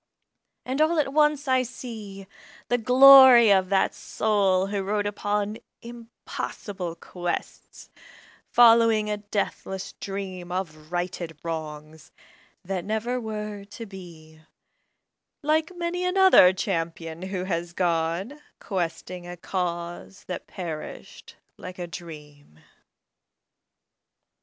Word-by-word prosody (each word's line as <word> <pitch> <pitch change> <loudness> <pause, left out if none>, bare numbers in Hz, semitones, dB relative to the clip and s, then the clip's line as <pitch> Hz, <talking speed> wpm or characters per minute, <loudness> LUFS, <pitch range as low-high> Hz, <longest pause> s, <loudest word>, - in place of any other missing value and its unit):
And 265 +4 -1
all 320 +2 +3
at 275 -3 0
once 300 -1 +2
I 260 -1 +3
see 220 -6 -8 0.4
The 245 - +2
glory 255 -1 +8
of 190 -2 +3
that 195 -1 +2
soul 195 -3 +1
who 200 0 -2
rode 205 +2 -1
upon 205 +1 -2 0.2
Impossible 225 -6 -7
quests, 175 +1 -6 0.6
following 230 -3 +5
a 210 - -1
deathless 200 -2 -4
dream 190 -3 -6
Of 155 -4 -5
righted 175 -2 -4
wrongs, 155 -1 -7 0.5
that 185 -1 -3
never 225 +5 -2
were 210 -2 -5
to 205 +3 -10
be, 165 -5 -13 1.0
Like 310 +3 +1
many 350 +1 -3
another 365 - +6
champion 165 -3 -4
who 190 -1 -4
has 175 -2 -3
gone 175 - -1 0.2
Questing 175 -1 -4
a 175 0 -8
cause 175 +1 -5
that 180 - -7
perished 165 -4 -8 0.2
like 180 0 -9
a 175 - -4
dream. 150 - -11
195 Hz, 105 wpm, -25 LUFS, 175-230 Hz, 1.0 s, glory